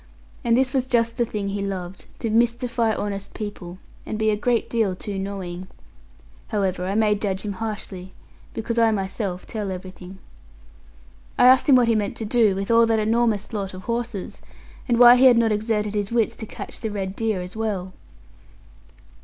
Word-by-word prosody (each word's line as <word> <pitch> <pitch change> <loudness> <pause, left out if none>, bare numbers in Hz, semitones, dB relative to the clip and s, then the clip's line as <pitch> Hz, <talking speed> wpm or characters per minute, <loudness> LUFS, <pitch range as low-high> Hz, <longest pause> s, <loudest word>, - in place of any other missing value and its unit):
And 235 0 +3
this 260 -1 +1
was 260 -2 0
just 230 -2 +1
the 240 - +2
thing 205 -3 -4
he 200 0 -3
loved 185 -2 -5
to 225 - -1
mystify 235 0 +1
honest 200 -1 -4
people, 200 -5 -7 0.3
and 215 - -5
be 220 0 +2
a - - +1
great 235 +2 0
deal 220 -5 0
too 195 +1 -5
knowing. 190 -2 -5 0.8
However, 190 -4 -1
I 195 - -2
may 215 -1 +3
judge 200 -2 -2
him 205 -2 -3
harshly, 190 -3 -6 0.4
because 230 +1 -2
I 230 -1 +5
myself 195 -2 -3
tell 210 -4 -4
everything. 185 0 -8 1.2
I - - +5
asked 260 +3 +6
him 270 - +8
what 245 -2 +4
he 230 - +4
meant 210 -2 -1
to 225 - -4
do 215 -3 +3
with 195 +3 -2
all 230 0 +5
that 225 -1 +2
enormous 220 -1 0
lot 195 -3 -4
of 185 - -9
horses, 235 -4 -4 0.5
and 240 -2 +2
why 245 +1 +9
he 260 - +5
had 250 -2 +7
not 230 -1 +3
exerted 210 -1 -1
his 205 0 -2
wits 230 -2 +1
to 220 - -7
catch - - -7
the 220 - -3
red 195 -2 -4
deer 220 -3 -1
as 180 +2 -7
well. 200 -4 -3
215 Hz, 185 wpm, -23 LUFS, 195-230 Hz, 1.2 s, why